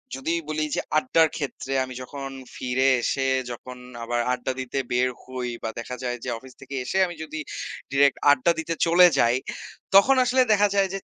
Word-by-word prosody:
যদি 135 +5 -2 0.2
বলি 155 0 -1
যে - - 0 0.2
আড্ডার 160 +3 +4
ক্ষেত্রে 135 -2 -4
আমি 130 0 -7
যখন 135 +1 -7 0.3
ফিরে 130 +1 0
এসে 135 +2 0 0.2
যখন 125 +1 -9 0.3
আবার 120 +1 -1
আড্ডা 125 +1 -2
দিতে 130 +1 -3
বের 125 +1 +2
হই 130 -1 -5
বা 115 - -1
দেখা 120 +2 -5
যায় 125 -1 -2
যে - - -4
অফিস 130 +2 -14
থেকে 135 0 -8
এসে 190 - -2
আমি 175 - -7
যদি 155 0 -6 0.5
ডিরেক্ট 140 0 +4
আড্ডা 145 +4 +3
দিতে 165 +1 -2
চলে 175 +2 +7
যাই 120 +1 +4 0.6
তখন 255 +8 +7
আসলে 255 +1 +3
দেখা 205 0 +4
যায় 195 -1 +3
যে 195 - -3
135 Hz, 185 wpm, -25 LUFS, 125-165 Hz, 0.6 s, চলে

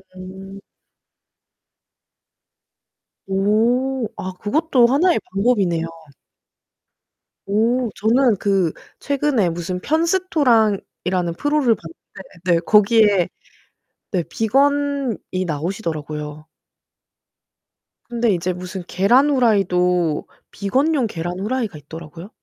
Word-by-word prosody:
음. 190 +1 -10 2.7
오 230 +6 +1
아 185 - -4
그것도 260 +2 +2
하나의 330 +8 +3
방법 215 +4 +2
이네요. 170 -3 0 1.6
오 230 +4 +1
저는 230 +1 +3
그 195 -4 +1 0.3
최근에 275 -9 +1
무슨 175 +2 -4
편스토랑이라는 240 - +1
프로를 290 -6 +2
봤는데 165 +1 -13 0.3
네 165 - +3
거기에. 210 -3 +4 0.9
네 180 -3 +1
비건이 275 - 0
나오시더라고요. 155 -3 -4 1.6
근데 235 -2 +1
이제 180 +1 -1
무슨 180 +1 -7
계란 240 +10 +3
후라이도 180 - +2 0.2
비건용 265 +6 0
계란 175 -2 -5
후라이가 215 -4 -2
있더라고요. 165 +4 -10
205 Hz, 205 characters per minute, -20 LUFS, 180-255 Hz, 2.7 s, 거기에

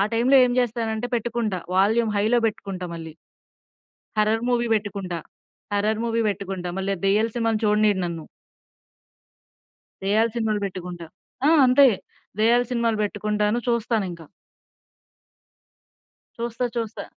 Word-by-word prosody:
టైమ్‌లో 245 +4 +4
ఏం 245 - +1
చేస్తానంటే 230 -1 -1
పెట్టుకుంటా 230 -4 -1 0.2
వాల్యూమ్ 220 +4 +3
హైలో 220 +4 +3
పెట్టుకుంటా 195 -4 -4
మళ్ళీ. 160 -1 -8 1.1
హారర్ 215 +1 +2
మూవీ 240 -1 +1
పెట్టుకుంటా. 200 -5 -3 0.5
హారర్ 210 +2 +1
మూవీ 230 0 0
పెట్టుకుంటా 190 -2 -4
మళ్ళా 195 +1 -1
ఆ - - -18
దెయ్యాలు 210 +4 +2
సినిమాలు 225 -2 +1
చూడనియ్యడు 210 -2 +3
నన్ను. 170 -2 -5 1.8
దెయ్యాలు 215 +4 +2
సినిమాలు 215 -2 0
పెట్టుకుంటా. 180 -2 -7 0.4
ఆ! - - +6 0.2
అంతే. 265 +2 +6 0.5
దెయ్యాలు 235 +3 +4
సినిమాలు 235 -2 +1
పెట్టుకుంటాను 210 +1 0
చూస్తానింకా. 215 -8 -1 2.1
చూస్తా. 235 +1 -3
చూస్తా. 230 -1 -3
215 Hz, 110 wpm, -24 LUFS, 195-230 Hz, 2.1 s, ఆ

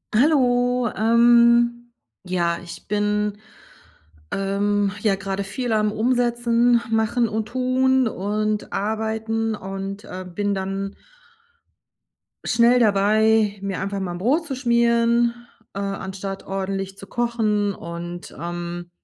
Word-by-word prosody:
Hallo. 245 -3 +3
Ähm, 235 +1 +4 0.3
ja, 175 -2 0
ich 170 0 -10
bin, 210 0 0 0.9
ähm, 200 +1 0
ja, 205 -2 +2
grade 195 0 -3
viel 240 +4 -3
am 215 -1 +2
Umsetzen, 240 0 +2
Machen 225 +2 +2
und 215 0 -3
Tun 255 +2 +2
und 215 +1 -2
Arbeiten 220 +1 -1
und, 195 +1 -6
äh, 185 -3 -7
bin 205 +3 -1
dann 195 +1 -3 1.5
schnell 235 +2 +4
dabei, 215 0 +3
mir 195 -1 -3
einfach 200 +1 -3
mal 185 -2 -3
'n - - -5
Brot 270 - +1
zu 280 -4 -4
schmieren, 235 -1 +2 0.4
äh, 195 - -5
anstatt 195 0 -5
ordentlich 195 0 -4
zu 195 - -10
kochen. 215 -3 0
Und, 175 +1 -7
ähm 175 +1 -5
215 Hz, 115 wpm, -22 LUFS, 195-235 Hz, 1.5 s, Ähm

